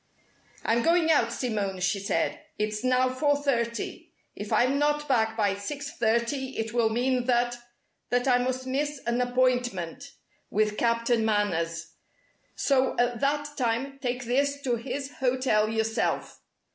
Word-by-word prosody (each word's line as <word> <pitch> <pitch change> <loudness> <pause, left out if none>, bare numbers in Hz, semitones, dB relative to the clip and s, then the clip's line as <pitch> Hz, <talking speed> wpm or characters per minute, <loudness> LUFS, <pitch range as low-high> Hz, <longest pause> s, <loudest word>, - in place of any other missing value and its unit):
"I'm 230 +1 +2
going 330 +2 +3
out, 235 -7 +3
Simone," 210 -6 -2
she 185 +2 0
said. 200 - -1 0.2
"It's 210 +1 -2
now 255 0 +3
four 285 +3 +1
thirty. 235 -5 -2 0.2
If 205 +1 -7
I'm 250 +6 +3
not 295 0 +1
back 225 -4 +1
by 205 -3 +2
six 285 +9 -5
thirty 235 +4 0
it 225 0 -3
will 235 -2 +3
mean 250 +2 0
that 240 -1 +1 0.5
that 245 +1 +1
I 250 -1 +4
must 255 +1 -2
miss 290 +3 -1
an 235 +1 +1
appointment 250 -1 0 0.4
with 210 0 +1
Captain 230 0 +2
Manners; 170 -6 -1 0.6
so 265 -2 +1
at 245 -1 +1
that 290 +2 -1
time 260 +3 -1
take 250 0 -2
this 280 +4 +1
to 245 -2 +1
his 275 +4 -5
hotel 250 -5 +2
yourself. 220 +1 -1
245 Hz, 145 wpm, -27 LUFS, 220-265 Hz, 0.6 s, I